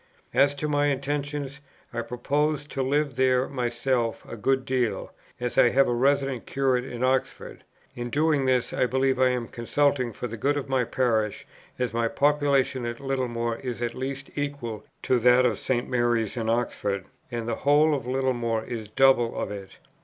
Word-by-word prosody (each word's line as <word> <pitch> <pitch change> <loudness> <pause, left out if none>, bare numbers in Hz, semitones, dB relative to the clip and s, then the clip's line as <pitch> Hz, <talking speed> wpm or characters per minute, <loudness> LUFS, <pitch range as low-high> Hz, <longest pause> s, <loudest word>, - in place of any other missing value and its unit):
"As 140 +1 +4
to 150 +2 -3
my 145 -1 +2
intentions, 145 0 -2 0.3
I 120 - -1
purpose 145 +5 -1
to 140 -2 -4
live 140 0 0
there 130 -1 +3
myself 120 -2 -1
a - - -7
good 130 +4 0
deal, 130 -4 -1 0.3
as 125 0 -1
I 120 - +7
have 135 +2 +4
a 120 - +1
resident 135 0 +1
curate 130 -2 +1
in 125 -1 -5
Oxford. 130 0 -1 0.3
In 120 0 -4
doing 145 -1 +2
this, 125 -1 +1
I 125 - +2
believe 130 +1 +1
I 130 0 +5
am 125 -2 -2
consulting 130 +1 0
for 115 - -6
the 115 -1 -5
good 145 +6 +1
of 140 - -3
my 130 -2 +1
parish, 115 -4 0 0.3
as 125 -3 -1
my 115 0 +1
population 140 -1 +2
at 120 0 -5
Littlemore 120 -4 -2
is 125 -3 -5
at 120 0 -2
least 135 +1 -5
equal 140 -7 -4 0.2
to 125 - +2
that 125 +2 +5
of 115 -5 +1
St. 120 -2 -1
Mary's 120 -3 +1
in 115 -2 -2
Oxford, 110 -4 -1 0.2
and 120 -2 -4
the 115 - -1
whole 150 +2 +4
of 135 -4 -3
Littlemore 120 -4 0
is 110 -3 -6
double 130 -1 +3
of - - -3
it. 100 -2 -8
130 Hz, 180 wpm, -26 LUFS, 120-140 Hz, 0.3 s, I